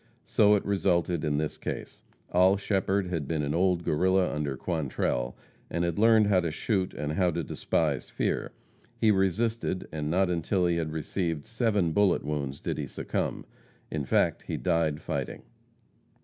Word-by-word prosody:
So 105 -1 +4
it 100 - -1
resulted 90 -4 +1
in 75 -2 0
this 75 0 -2
case. - - -6 0.3
Oll 95 +2 +5
Shepherd 100 -1 0
had 80 -6 -2
been 80 -1 -1
an 70 +1 -1
old 90 0 +2
Guerrilla 95 +4 +2
under 75 -3 -2
Quantrell, 65 -6 -2 0.3
and 85 - -1
had 85 +2 -1
learned 110 -1 +6
how 100 -2 +4
to 85 -2 -1
shoot 95 +4 -1
and 75 0 -3
how 90 +2 +2
to 85 0 -2
despise 75 -1 -1
fear. - - -1 0.5
He 110 -2 +4
resisted, 100 +1 0
and 75 -1 -3
not 90 +2 +2
until 90 +2 +1
he 85 -1 +2
had 80 -2 -2
received 80 0 -2
seven 110 -7 +1
bullet 100 +1 +3
wounds 70 -2 -3
did - - -3
he - - -3
succumb. - - -3 0.5
In 75 -2 -2
fact, - - +1
he - - -2
died 80 -4 0
fighting. - - -4
85 Hz, 165 wpm, -28 LUFS, 75-95 Hz, 0.5 s, learned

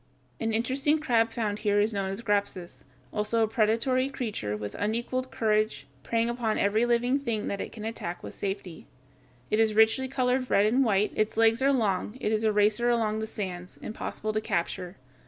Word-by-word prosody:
An 225 - -1
interesting 265 +7 +1
crab 235 -7 +2
found 215 -3 -2
here 205 -1 +2
is 215 +2 +2
known 195 -1 -1
as 195 +4 -5
Grapsus, 200 -5 -1 0.3
also 215 +2 +1
a - - +2
predatory 235 +4 +1
creature 205 - -3
with 105 -1 -6
unequaled 240 +5 -2
courage, 215 - 0 0.2
preying 230 +6 0
upon 235 -2 -1
every 215 +4 +2
living 245 +3 +2
thing 230 -6 -2
that 200 - -3
it - - -5
can 215 -1 -8
attack 180 -6 -5
with - - -7
safety. 195 -4 -5 0.6
It 215 - +2
is 220 -1 +3
richly 220 +4 +4
colored 255 -1 0
red 200 - +4
and 245 +6 +3
white; 210 -3 +2
its 215 0 -1
legs 225 +2 +4
are 275 +1 +4
long; 210 -3 0
it 215 - -1
is 220 0 +1
a 220 - +3
racer 210 +3 +2
along 220 -2 +1
the 220 - -3
sands, 185 -4 -6
impossible 215 0 -4
to 215 - 0
capture. 180 -1 -2
220 Hz, 190 wpm, -28 LUFS, 205-235 Hz, 0.6 s, richly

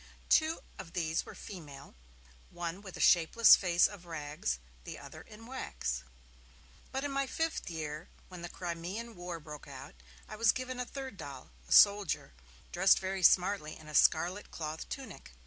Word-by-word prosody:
Two 315 +1 +3 0.2
of 165 - -9
these 160 -2 -1
were - - -9
female, 145 -8 -10 0.6
one 175 +2 -5
with 190 -3 -9
a - - -10
shapeless 180 +7 +7
face 175 -2 +3
of 190 -4 -4
rags, 145 - -3 0.3
the - - -7
other - - -10
in 220 +2 -13
wax. 70 - -4 0.9
But, 265 +1 -2
in 285 - -2
my 275 0 0
fifth 325 - -2
year, 155 -1 -5 0.2
when 180 -2 -10
the 175 - -6
Crimean 180 +8 -5
War 175 -1 -6
broke 150 -1 -10
out, 135 -1 -10 0.3
I 215 - -8
was 230 0 +5
given 255 0 -4
a 250 - -1
third 265 -6 -7
doll, 135 - -9 0.2
a - - -15
soldier, 200 - +5 0.4
dressed 190 +2 +5
very 190 0 -3
smartly 180 -3 +3
in 155 - -14
a 155 - -9
scarlet 175 +7 +3
cloth 155 0 -6
tunic. 230 - -8
175 Hz, 165 wpm, -32 LUFS, 160-215 Hz, 0.9 s, shapeless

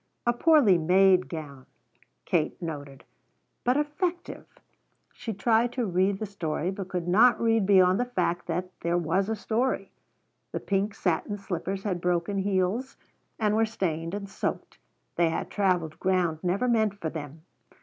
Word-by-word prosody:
A 240 - +3
poorly 240 - +5
made 185 +2 +4
gown, 145 -5 -8 0.6
Katie - - 0
noted, 145 -5 -7 0.6
but 250 +3 +2
effective. 345 +4 -3 0.7
She 225 - -5
tried 225 +3 +2
to 250 -3 -1
read 190 +1 +1
the 215 - -4
story, 175 -3 -3
but 195 -1 -6
could 180 -2 -4
not 230 +7 +5
read 225 -3 +2
beyond 185 -1 +5
the 245 - +1
fact 180 -7 -2
that 180 +2 -3
there 170 +1 0
was 180 +4 0
a 225 - 0
story. 225 -2 -1 0.6
The - - -2
pink 200 +1 -1
satin 185 +3 -1
slippers 195 0 -4
had 185 -4 -2
broken 180 +3 0
heels 195 +7 -1 0.4
and 210 -1 +1
were 225 - +3
stained 175 -6 -2
and 200 -1 -5
soaked. 195 - -4 0.4
They 170 -1 +3
had 160 - -3
traveled 180 -6 0
ground 180 -4 +1
never 190 +8 0
meant 220 -4 +2
for 160 -4 -3
them. 155 0 -8
190 Hz, 155 wpm, -27 LUFS, 175-220 Hz, 0.7 s, poorly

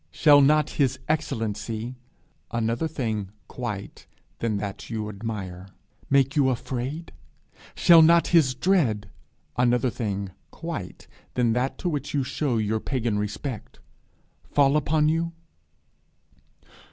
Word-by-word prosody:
'Shall 145 - +6
not 150 +2 +4
his 135 -1 +2
excellency' 115 -5 -2 0.5
another 115 +5 -1
thing 110 -10 -3 0.2
quite - - -6 0.3
than 110 -3 0
that 100 -1 -6
you 110 -2 -3
admire 100 -4 -6 0.4
'make 140 +1 +3
you 140 -3 +4
afraid? 130 +6 -4 0.6
Shall 170 -1 +7
not 170 +1 +5
his 150 -7 +4
dread' 120 - +1 0.5
another 125 0 +2
thing 100 -4 -3 0.2
quite - - -7 0.3
than 120 -2 +2
that 125 +3 -1
to - - -3
which 145 -4 -2
you 140 - +2
show 130 -1 -1
your 110 0 0
pagan 115 -4 -1
respect 105 +3 -5 0.7
'fall 140 0 +3
upon 150 +1 +2
you?' 165 +2 0
125 Hz, 115 wpm, -25 LUFS, 110-150 Hz, 0.7 s, Shall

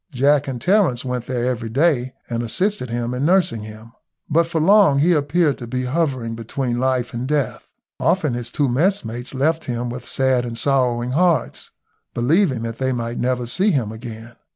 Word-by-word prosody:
Jack 140 +2 +2
and 130 -3 -4
Terence 180 - +2
went 125 -1 -3
there 125 -2 -1
every 120 -3 -2
day, 130 -1 +1
and 115 -1 -2
assisted 180 - -1
in 120 0 -2
nursing 165 - +2
him, 110 +2 -11 0.4
but 165 +2 +2
for 165 -1 -1
long 195 -3 +5
he 165 +5 +4
appeared 150 0 +1
to 120 - -7
be 125 +2 -2
hovering 130 -4 -1
between 120 +2 -3
life 130 -1 0
and 120 +2 -3
death. 145 -2 -1 0.3
Often 155 -8 +1
his 120 0 -4
two 145 +2 0
messmates 125 - -1
left 160 +5 0
him 120 -1 -3
with 125 +1 -7
sad 130 -2 +1
and 120 -1 -5
sorrowing 125 -2 +1
hearts, 170 +4 +1 0.5
believing 130 - +2
that 115 0 -5
they 130 0 0
might 120 -1 -3
never 125 0 0
see 185 - +1
him 130 - 0
again. 115 +1 -9
130 Hz, 175 wpm, -21 LUFS, 120-150 Hz, 0.5 s, long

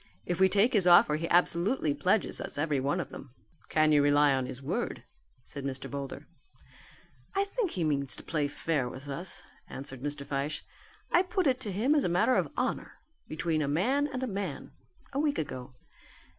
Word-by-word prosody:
If 175 0 -2
we 190 0 +6
take 205 +7 +3
his 195 -5 +3
offer 175 -3 +7
he 165 +2 -3
absolutely 175 - +2
pledges 185 +8 +1
us - - -5
every 145 -2 +1
one 140 +7 0
of 170 - -4
them." 130 -2 -11 0.3
"Can 155 0 +3
you 145 -1 +5
rely 145 0 +4
on 130 -1 0
his 125 - -7
word?" 135 - -3 0.4
said 140 +2 -6
Mr. 135 -1 -4
Boulder. 140 +1 -5 1.1
"I 395 - +3
think 405 0 -1
he 180 - -2
means 140 -3 0
to - - -10
play 150 -3 0
fair 145 -3 -1
with 130 +3 -10
us," 170 +6 -4 0.3
answered 130 -2 -7
Mr. 145 0 -4
Fyshe. 140 +2 -3 0.5
"I 350 - +6
put 370 0 -1
it 255 -3 +2
to 215 -6 -4
him 225 +10 +2
as 295 -3 +3
a - - +1
matter 180 +9 +3
of - - +1
honour, - - -2 0.3
between 160 0 -1
man 265 - +2
and 260 -1 -2
man, 195 - -4 0.4
a 275 - 0
week 295 -1 +1
ago. 130 -3 -5
160 Hz, 185 wpm, -30 LUFS, 140-205 Hz, 1.1 s, offer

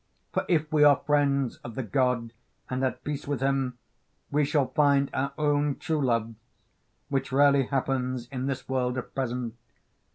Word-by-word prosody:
For - - 0
if 155 -3 +1
we 150 -1 +5
are 145 -1 +8
friends 140 -3 +2
of 120 -2 -10
the 130 - -2
God 115 +1 0 0.4
and 130 +1 -1
at 130 - -1
peace 145 -1 -4
with 145 -3 -1
him 135 -2 0 0.5
we 150 +1 +2
shall 145 -1 +2
find 140 -2 +3
our 140 +1 -1
own 145 -1 +1
true 155 -3 -1
loves, 115 -3 0 0.8
which 135 -1 -1
rarely 140 -1 +4
happens 130 -2 -1
in 130 0 -3
this 135 -1 -3
world 125 -1 0
at 125 - -6
present. 125 -3 -2
135 Hz, 165 wpm, -27 LUFS, 125-145 Hz, 0.8 s, are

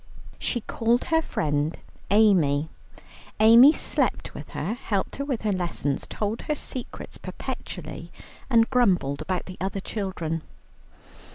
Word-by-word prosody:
She 240 - -1
called 235 +3 +1
her 320 -1 +2
friend 150 - -1 0.3
Amy. 175 -8 +4 0.7
Amy 230 +6 +9
slept - - -1
with - - -9
her, 215 - -1
helped 205 -4 -2
her 280 - -2
with 260 -6 -2
her 215 - +1
lessons, 170 -7 -2
told 215 +2 -2
her 300 - +1
secrets 255 -3 -6
perpetually, - - -7 0.4
and 230 -2 +5
grumbled 185 - +2
about 185 -2 -2
the 185 - -9
other 195 +1 -2
children. 185 -6 -3
205 Hz, 125 wpm, -25 LUFS, 170-235 Hz, 0.7 s, Amy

